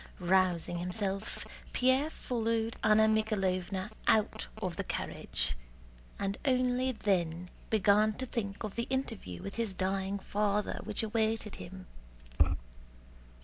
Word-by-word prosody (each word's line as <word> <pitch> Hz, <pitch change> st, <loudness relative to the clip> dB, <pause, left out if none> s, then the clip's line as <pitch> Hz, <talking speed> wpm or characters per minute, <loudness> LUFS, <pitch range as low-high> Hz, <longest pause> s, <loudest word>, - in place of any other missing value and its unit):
Rousing 180 Hz, -1 st, +2 dB
himself, 195 Hz, +3 st, -2 dB, 0.3 s
Pierre 260 Hz, +4 st, +3 dB
followed 230 Hz, -5 st, -1 dB
Anna 215 Hz, 0 st, +6 dB
Mikháylovna 195 Hz, -3 st, 0 dB, 0.2 s
out 210 Hz, -, +3 dB
of -, -, -2 dB
the -, -, -2 dB
carriage, -, -, -2 dB, 0.6 s
and 195 Hz, 0 st, -2 dB
only 255 Hz, -1 st, +2 dB
then 180 Hz, -5 st, 0 dB, 0.2 s
began 215 Hz, 0 st, +4 dB
to 260 Hz, -, -3 dB
think 205 Hz, -5 st, -3 dB
of 210 Hz, -2 st, -3 dB
the 235 Hz, -, -2 dB
interview 225 Hz, -, -3 dB
with 200 Hz, -, -6 dB
his 225 Hz, -5 st, -1 dB
dying 190 Hz, +1 st, 0 dB
father 205 Hz, +1 st, 0 dB
which 215 Hz, +1 st, 0 dB
awaited 220 Hz, -1 st, 0 dB
him. 185 Hz, +1 st, -9 dB
210 Hz, 115 wpm, -32 LUFS, 190-225 Hz, 0.6 s, Anna